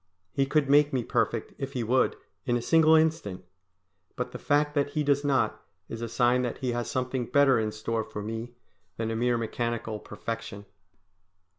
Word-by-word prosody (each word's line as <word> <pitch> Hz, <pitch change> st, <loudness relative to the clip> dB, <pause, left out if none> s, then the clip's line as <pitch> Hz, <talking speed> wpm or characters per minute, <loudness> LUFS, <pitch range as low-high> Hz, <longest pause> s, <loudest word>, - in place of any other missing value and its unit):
He 135 Hz, 0 st, +1 dB
could 150 Hz, 0 st, +2 dB
make 145 Hz, +1 st, +5 dB
me 130 Hz, -3 st, 0 dB
perfect -, -, -1 dB
if 135 Hz, 0 st, -4 dB
He 125 Hz, -4 st, -1 dB
would, 125 Hz, +3 st, +2 dB, 0.3 s
in 120 Hz, -1 st, +2 dB
a -, -, -3 dB
single 160 Hz, +3 st, +5 dB
instant. 155 Hz, -, +1 dB, 0.7 s
But -, -, -3 dB
the -, -, -7 dB
fact 145 Hz, 0 st, +1 dB
that 145 Hz, -1 st, +1 dB
He 150 Hz, -, 0 dB
does 145 Hz, 0 st, +2 dB
not, 140 Hz, -2 st, +1 dB, 0.3 s
is 115 Hz, -, -6 dB
a 115 Hz, -, -3 dB
sign 120 Hz, +2 st, +3 dB
that 125 Hz, -1 st, -2 dB
He 130 Hz, -2 st, -2 dB
has 120 Hz, 0 st, -2 dB
something 125 Hz, -1 st, -2 dB
better 140 Hz, -3 st, +4 dB
in 110 Hz, -1 st, -1 dB
store 110 Hz, +1 st, -2 dB
for 105 Hz, -1 st, -7 dB
me 115 Hz, +3 st, -5 dB, 0.4 s
than 115 Hz, 0 st, -2 dB
a -, -, -2 dB
mere 120 Hz, +1 st, +1 dB
mechanical 115 Hz, -1 st, -3 dB
perfection. 115 Hz, -1 st, -6 dB
125 Hz, 185 wpm, -28 LUFS, 115-140 Hz, 0.7 s, make